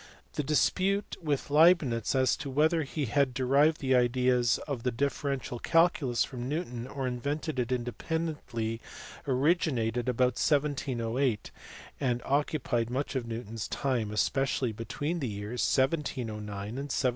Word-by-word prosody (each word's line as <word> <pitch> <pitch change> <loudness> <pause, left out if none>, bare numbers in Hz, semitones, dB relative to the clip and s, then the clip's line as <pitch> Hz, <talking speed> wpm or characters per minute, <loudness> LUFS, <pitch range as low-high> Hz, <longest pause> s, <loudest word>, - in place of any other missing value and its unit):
The 150 - -1
dispute 185 +7 +1
with 145 -3 -2
Leibnitz 150 - +4
as 130 -1 +3
to 140 - -5
whether 155 +5 +3
he 140 0 -3
had 135 +1 +1
derived 140 +4 +3
the 135 -1 +2
ideas 125 -1 +3
of 140 -5 -3
the 125 - 0
differential 135 0 -2
calculus 165 -7 +3
from 125 -1 -5
Newton 125 -6 -3
or 135 0 -4
invented 140 +4 -2
it 125 0 -1
independently 120 -3 -3 0.5
originated 130 -4 +1
about 125 0 +2
1708, 135 -5 0 0.5
and 125 -3 +1
occupied 135 -4 0
much 135 +3 -2
of 125 -3 -2
Newton 115 -1 -6
s 115 -3 -4
time, 125 -6 -1
especially 125 +3 0
between 115 +10 -3
the 135 - -2
years 105 +4 -4
1709 130 -6 0
and - - -7 0.3
1716. 140 -1 0
130 Hz, 135 wpm, -29 LUFS, 120-145 Hz, 0.5 s, Leibnitz